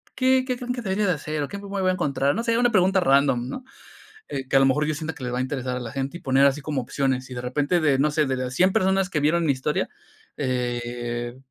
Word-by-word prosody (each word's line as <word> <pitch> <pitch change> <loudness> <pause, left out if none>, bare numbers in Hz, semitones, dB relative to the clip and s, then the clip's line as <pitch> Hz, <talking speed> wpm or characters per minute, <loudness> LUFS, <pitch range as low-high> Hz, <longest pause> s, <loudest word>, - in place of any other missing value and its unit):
¿qué 260 0 +3
qué 250 -2 -1
creen 250 0 -3
que 245 - -5
debería 200 -1 0
de 180 - +3
hacer?, 155 0 -3
o - - -3
¿qué 200 - -7
me - - -12
me 200 0 -3
voy 185 - +1
a - - +2
encontrar?", 140 -4 0
no 230 - -2
sé, 230 -1 +1
una 245 0 +3
pregunta 190 -2 +3
random, 135 -5 +3
¿no?, 255 - -6 0.7
eh, 135 -1 -4
que - - -4
a 135 - +7
lo 135 - +5
mejor 150 +3 +2
yo 155 - 0
sienta 160 +1 -5
que 135 - -7
le 125 - -3
va 125 - -1
a - - -1
interesar 130 -1 -2
a - - -3
la 120 -2 -6
gente 135 +4 -3
y - - -18
poner 135 +1 +4
así 140 +1 +1
como 145 -1 -2
opciones, 130 0 -1
y - - -6
de 125 - -4
repente 145 +7 0
de, 145 -4 +2
no 150 +2 +2
sé, 155 - 0
de 130 -1 -1
de 130 - -2
las 125 0 -5
100 185 +6 +3
personas 190 0 +2
que 155 - 0
vieron 165 +4 +2
mi - - +2
historia, 135 +3 -1 0.5
eh, 120 -2 -3
145 Hz, 290 wpm, -24 LUFS, 130-185 Hz, 0.7 s, a